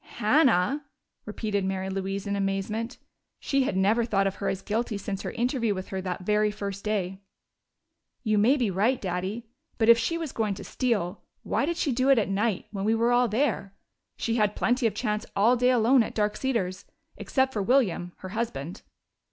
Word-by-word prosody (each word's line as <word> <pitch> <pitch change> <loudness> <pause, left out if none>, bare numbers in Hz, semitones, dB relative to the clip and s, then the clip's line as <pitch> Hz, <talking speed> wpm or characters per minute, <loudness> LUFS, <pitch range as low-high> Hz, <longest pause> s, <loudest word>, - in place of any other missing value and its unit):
"Hannah!" 260 - +3 0.4
repeated 210 -2 -2
Mary 190 0 -2
Louise 195 0 -3
in 200 0 -1
amazement. 200 +4 -2 0.4
She 275 -2 +1
had 190 - -1
never 210 +5 +3
thought 195 -4 +1
of 195 0 -1
her 200 - -3
as 190 - -3
guilty 220 0 -1
since 200 -1 -4
her - - -4
interview 235 -3 0
with 185 0 -6
her 190 -1 -3
that 180 -1 -4
very 210 +1 +2
first 200 -1 -5
day. 195 -3 -2 1.0
"You 215 -3 +2
may 250 +8 +4
be 235 -7 0
right, 220 +8 +1
Daddy. 190 +5 -3 0.3
But 225 -1 +2
if 235 0 +8
she 335 +7 0
was 325 -4 -4
going 215 -3 -1
to - - -8
steal, 210 -8 -1 0.2
why 280 - 0
did 340 0 -1
she 300 - 0
do 255 +2 +1
it 270 - +6
at 210 -3 +1
night, 200 0 0
when 195 -2 -4
we 220 +2 +2
were 245 +2 +3
there? 215 -4 -1 0.4
She 230 0 -1
had 210 -2 +2
plenty 250 -1 +2
of 210 - -3
chance 210 0 -1
all 225 +5 +4
day 250 +1 +3
alone 250 +1 +5
at 225 - -3
Dark 210 -1 +1
Cedars 195 -8 -2 0.3
except 265 -1 0
for 210 - -1
William, 195 -7 +1
her - - -5
husband." 185 -6 -4
210 Hz, 195 wpm, -27 LUFS, 195-240 Hz, 1.0 s, if